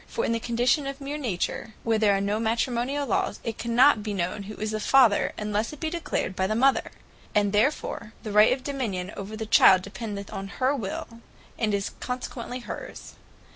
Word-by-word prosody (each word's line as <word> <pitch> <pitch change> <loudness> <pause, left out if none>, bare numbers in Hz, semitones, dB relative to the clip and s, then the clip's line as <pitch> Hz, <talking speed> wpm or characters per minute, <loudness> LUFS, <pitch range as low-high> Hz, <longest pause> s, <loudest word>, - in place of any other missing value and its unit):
For 465 - -2
in - - 0
the 230 - 0
condition 245 +5 +1
of 275 0 -5
Meer 285 +2 -5
Nature, 220 -2 -3
where 225 -1 +1
there 205 -2 +4
are - - -1
no 205 +2 0
Matrimoniall 240 +5 0
lawes, 215 - 0
it 230 - -4
cannot 235 +1 +4
be 210 -1 -3
known 185 +3 -2
who 215 - -7
is 215 0 -3
the 215 - -2
Father, 240 -3 +4
unlesse 210 +4 -2
it 300 - -10
be 315 0 -2
declared 335 - -2
by 190 0 0
the 215 - -1
Mother: 265 +4 +3 0.5
and 205 -1 +2
therefore 230 -1 0
the 215 - -5
right 210 +2 +6
of 255 0 -1
Dominion 215 -10 -3
over 205 +2 -6
the 220 - -4
Child 190 -4 +6
dependeth 205 -4 -6
on 195 0 -5
her 260 +3 +2
will, 230 0 -6 0.4
and 220 -2 +1
is 200 -1 -2
consequently 250 0 -5
hers. - - -8
225 Hz, 200 wpm, -26 LUFS, 205-255 Hz, 0.5 s, right